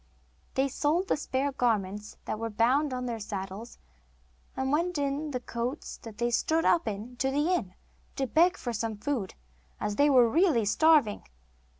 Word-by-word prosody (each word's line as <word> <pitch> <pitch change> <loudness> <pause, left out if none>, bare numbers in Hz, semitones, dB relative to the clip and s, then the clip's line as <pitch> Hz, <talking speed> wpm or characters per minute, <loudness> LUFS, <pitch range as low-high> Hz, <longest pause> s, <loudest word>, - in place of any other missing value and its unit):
They 270 0 +2
sold 310 +7 0
the - - +3
spare 280 -1 -1
garments 210 -5 -1
that 215 - -3
were 230 0 -2
bound 255 +7 +2
on 250 0 -3
their 235 -2 -3
saddles, 200 +2 -6 0.8
and 265 0 -1
went 340 +3 +1
in 285 +2 -1
the 255 -3 -3
coats 245 +4 -5
they 230 +2 -3
stood 320 +7 +1
up 340 -7 +3
in 220 +4 -5
to 265 - +1
the 295 +6 +1
inn, 195 - -2 0.4
to 270 - 0
beg 340 +8 +3
for 240 - -4
some 220 -1 -3
food, 225 -3 -3 0.4
as 205 - -2
they 290 +1 +5
were 250 -4 +6
really 295 - +3
starving. 285 - +3
250 Hz, 170 wpm, -29 LUFS, 225-295 Hz, 0.8 s, were